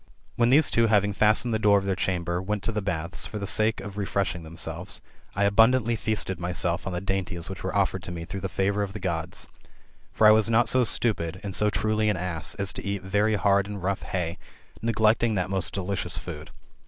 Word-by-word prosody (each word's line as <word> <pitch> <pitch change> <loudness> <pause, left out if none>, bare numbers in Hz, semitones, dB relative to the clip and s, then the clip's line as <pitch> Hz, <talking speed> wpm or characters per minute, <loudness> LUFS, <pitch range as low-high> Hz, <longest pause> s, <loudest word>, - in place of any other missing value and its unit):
When 120 0 +3
these 145 +4 +5
two 115 0 +3
having 105 -2 +2
fastened 110 +4 +3
the 110 - +1
door 105 -1 +5
of 100 - -1
their 95 -1 0
chamber, 90 -2 -1
went 105 +1 -3
to - - -1
the 105 -1 -2
baths, 85 -3 -4
for 105 - -6
the 100 - -4
sake 110 +3 +2
of 100 0 -7
refreshing 95 -3 -1
themselves, 80 +1 -5 0.4
I 100 - +1
abundantly 115 +3 +4
feasted 105 -5 -1
myself 85 0 -1
on 95 - -3
the 90 - -2
dainties 95 -2 -3
which 95 - -8
were 95 - -3
offered 95 -2 +1
to 90 - -6
me 85 -1 -6
through 95 +3 -6
the 95 0 -4
favour 100 +2 0
of 100 -2 -3
the 105 - -6
Gods. 85 -4 -3 0.6
For 110 - +2
I 105 - +9
was 110 0 +4
not 115 +2 +3
so 130 -1 +4
stupid, 90 -7 -1
and 100 -2 -5
so 105 +3 +2
truly 110 0 +1
an 105 - 0
ass, 85 -4 -2
as 100 -1 +1
to - - -7
eat 100 -2 -3
very 105 +3 +1
hard 100 -1 +2
and 100 -3 -7
rough 95 +1 -1
hay, 85 -2 -3 0.4
neglecting 110 0 +2
that 90 0 -1
most 95 -2 +1
delicious 100 0 -2
food. - - -7
100 Hz, 220 wpm, -26 LUFS, 90-110 Hz, 0.6 s, I